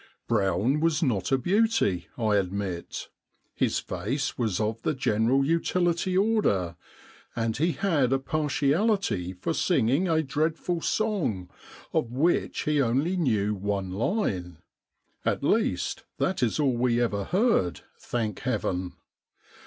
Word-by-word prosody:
Brown 105 - +1
was 165 0 +1
not 120 -7 0
a 135 - +4
beauty, 195 - +1
I 110 -3 +2
admit: 95 -2 -3 0.4
his - - 0
face 115 - -3
was 110 -7 -1
of 110 +1 -1
the 155 - 0
general 125 +2 +2
utility 175 +3 +1
order, 190 - +1 0.6
and 115 -1 -1
he 165 +4 +1
had 160 - +1
a 135 - +4
partiality 150 - 0
for 95 - -3
singing 145 +1 +2
a 160 -2 +2
dreadful 160 +4 -1
song 160 - -1 0.4
of 115 - 0
which 155 +8 +1
he 150 -1 +1
only 135 +9 +1
knew 110 - +1
one 100 -1 -2
line 95 - -1 0.3
— - - -58 0.3
at - - 0
least - - 0
that 190 - 0
is 120 +3 +1
all 135 -4 +2
we 120 0 +2
ever 100 -5 0
heard, 190 - +1 0.2
thank 110 -5 -3
Heaven 90 0 -2
130 Hz, 130 wpm, -27 LUFS, 100-165 Hz, 0.6 s, a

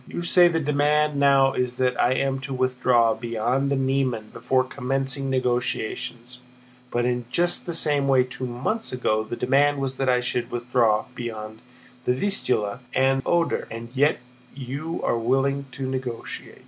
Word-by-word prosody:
"You 175 - -5
say 175 0 +6
the 165 -1 +1
demand 150 0 +1
now 135 -1 +4
is 125 -1 -1
that 125 0 +1
I 125 - +3
am 135 0 0
to 135 0 -5
withdraw 125 -2 +2
beyond 120 +4 -1
the 140 - +1
Niemen 130 -5 -1
before 130 -1 +1
commencing 135 +1 -2
negotiations, 125 -1 -2 0.5
but 120 0 0
in 125 -1 -1
just 175 +7 0
the 170 - -2
same 145 -3 +2
way 130 -2 +4
two 125 0 -6
months 130 - -2
ago 110 -4 0
the 110 - -5
demand 140 +4 +2
was 135 -1 -3
that 135 -1 0
I 125 0 +3
should 125 -1 -2
withdraw 120 -3 +1
beyond 110 -3 -6 0.5
the 125 - +2
Vistula 125 - 0 0.2
and 135 0 +3
the - - -11
Oder, 170 -1 +1
and 115 +1 -7
yet 145 +3 +3 0.4
you 140 +5 -5
are 115 - +1
willing 135 +3 0
to 130 0 -4
negotiate." 130 -3 -5
130 Hz, 165 wpm, -24 LUFS, 120-140 Hz, 0.5 s, say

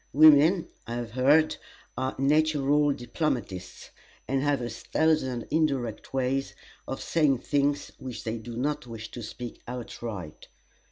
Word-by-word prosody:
Women, 155 +4 +7 0.2
I 120 - -3
have 120 -1 -4
heard, 145 +6 +4 0.4
are 130 0 -2
natural 145 0 +3
diplomatists, 120 - -3 0.4
and 135 0 +1
have 145 0 +2
a 120 - -3
thousand 130 0 0
indirect 135 -8 0
ways 135 +1 -1 0.3
of 135 - -4
saying 145 -6 +2
things 145 0 0
which 130 -2 -6
they 115 -1 -3
do 115 +1 -8
not 145 +1 -1
wish 110 -1 -8
to 120 - -7
speak 120 +2 -7
outright. 115 -8 -6
135 Hz, 130 wpm, -27 LUFS, 120-150 Hz, 0.4 s, Women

